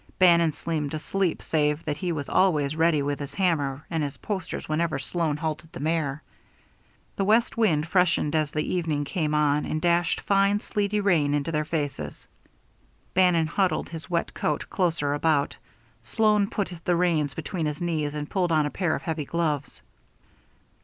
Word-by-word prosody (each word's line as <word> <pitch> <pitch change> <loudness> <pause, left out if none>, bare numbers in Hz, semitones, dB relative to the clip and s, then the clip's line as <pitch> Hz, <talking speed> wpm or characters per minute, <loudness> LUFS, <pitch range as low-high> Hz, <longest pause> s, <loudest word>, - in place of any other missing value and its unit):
Bannon 170 -3 +5
seemed 150 -1 -3
asleep 180 +3 -1
save 150 0 0
that 150 -2 -2
he 175 +3 -2
was 145 -4 -3
always 155 -6 +2
ready 160 -2 +3
with 145 0 -2
his 140 -1 -6
hammer 145 -7 0
and 165 -2 -2
his 145 -2 -3
posters 190 -5 -4
whenever 155 -1 0
Sloan 155 +1 -1
halted 155 +1 -4
the - - -8
mare. 150 -1 -1 0.9
The 195 - +1
west 220 +4 +3
wind 175 -10 +2
freshened 175 -4 +2
as 155 -2 +1
the 150 0 -1
evening 160 -5 -1
came 155 -1 -1
on 150 0 +2
and 155 - -2
dashed 170 0 +2
fine, 200 +1 +3
sleety 210 -1 -1
rain 160 -8 +2
into 145 +3 -1
their 155 -1 0
faces. 145 - -4 0.9
Bannon 180 -3 +4
huddled 185 +4 0
his 160 -3 -8
wet 170 -1 -1
coat 150 - -2
closer 165 -6 0
about 145 -1 +1
him. - - -21 0.4
Sloan 210 - +2
put 195 -3 -2
the 175 - +2
reins 160 -6 +1
between 170 -6 -3
his 150 0 -4
knees 155 -4 -1
and 150 -1 -4
pulled 180 -1 0
on 155 -2 +3
a 145 - -2
pair 175 -5 0
of - - -6
heavy 160 -4 -3
gloves. 155 -3 -2
160 Hz, 175 wpm, -26 LUFS, 150-180 Hz, 0.9 s, Bannon